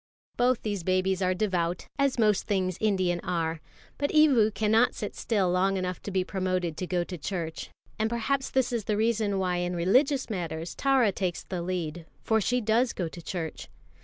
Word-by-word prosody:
Both 245 0 +2
these 205 -3 -2
babies 185 +2 +1
are 185 0 +2
devout, 180 -4 -1
as 275 -2 +2
most 210 -3 +2
things 185 -3 0
Indian 185 -5 +1
are. 165 -2 -2 0.4
But 285 0 +1
Evu 280 -9 +5
cannot 220 +3 +2
sit 210 - -5
still 195 -6 0
long 190 +2 +2
enough 185 -1 -3
to - - -6
be 190 -1 +1
promoted 185 -3 -2
to 185 - -3
go 175 -1 0
to 180 -1 -7
church; 165 -2 -4 0.3
and 220 +1 +1
perhaps 265 +4 -1
this 260 -2 +1
is 230 -4 -1
the 210 - 0
reason 215 -2 +1
why 180 -2 0
in 175 0 -1
religious 255 - +2
matters 170 -5 -4
Tara 265 -6 +3
takes 185 -2 -3
the 180 -2 -4
lead, 170 -2 -4 0.2
for 220 -1 +2
she 245 +4 +1
does 230 +3 +2
go 175 - -2
to 170 - -10
church. 165 -2 -5
190 Hz, 190 wpm, -28 LUFS, 180-225 Hz, 0.4 s, Evu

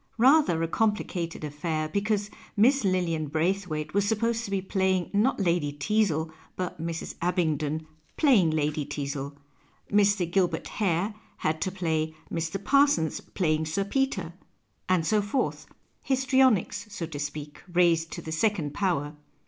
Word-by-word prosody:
Rather 250 - +5
a - - +1
comphcated 180 -4 -1
affair, 155 +1 -2
because 205 +4 -1 0.3
Miss 265 +7 +5
LiHan 175 -5 0
Braithwaite 160 -2 -1
was 200 +1 +3
supposed 230 +2 0
to - - -6
be 195 -1 0
playing 190 -1 0
not 220 +6 +2
Lady 170 -6 +1
Teazle 160 0 0 0.2
but 180 -3 -4
Mrs. 165 0 -4
Abington 160 -3 0 0.3
playing 240 - +5
Lady 150 -1 0
Teazle, 140 0 -4 0.6
Mr. 200 -3 +3
Gilbert 185 -1 +1
Hare 195 +1 0 0.2
had 155 0 -1
to 185 - 0
play 160 -4 -1 0.2
Mr. 165 +3 -2
Parsons 275 - +3
playing 155 -3 -1
Sir 180 +6 0
Peter, 200 -6 -1 0.6
and 180 -3 +3
so 215 +4 +3
forth 215 +6 -2 0.2
— - - -42
histrionics, 260 -6 +2
so 185 -5 -4
to 155 -3 -7
speak, 145 0 -6
raised 170 -2 +3
to - - -6
the 160 - -6
second 160 -4 0
power. 150 -5 -1
175 Hz, 140 wpm, -27 LUFS, 155-205 Hz, 0.6 s, Rather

